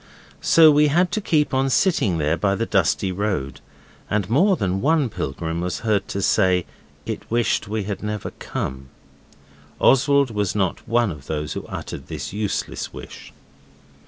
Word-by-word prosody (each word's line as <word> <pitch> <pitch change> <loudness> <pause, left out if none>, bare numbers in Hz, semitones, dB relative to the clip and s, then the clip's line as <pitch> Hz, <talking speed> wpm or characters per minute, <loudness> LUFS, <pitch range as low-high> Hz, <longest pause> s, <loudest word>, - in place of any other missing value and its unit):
So 160 -2 +7
we 150 +1 +4
had 175 +4 +2
to 215 - -1
keep 150 -7 +1
on 135 +1 +2
sitting 110 - +2
there 80 +1 +1
by 100 +2 +1
the 115 - -1
dusty 95 -1 +1
road, 90 -8 -3 0.5
and 100 -3 0
more 185 - +4
than 95 - -1
one 150 -2 +2
pilgrim 80 -1 -4
was 85 -4 -3
heard 105 -3 +1
to 100 - -3
say 95 -3 +3 0.4
it - - -6
wished 120 -3 +1
we 110 0 -2
had 100 -1 -5
never 105 -1 -4
come. 65 0 -5 0.9
Oswald 140 0 +4
was 105 -2 -1
not 95 -4 -1
one 115 -2 +2
of 75 -4 -10
those 75 -1 -3
who - - -6
uttered 65 - -7
this 75 -2 -6
useless 105 -1 -3
wish. - - -11
105 Hz, 160 wpm, -22 LUFS, 90-135 Hz, 0.9 s, So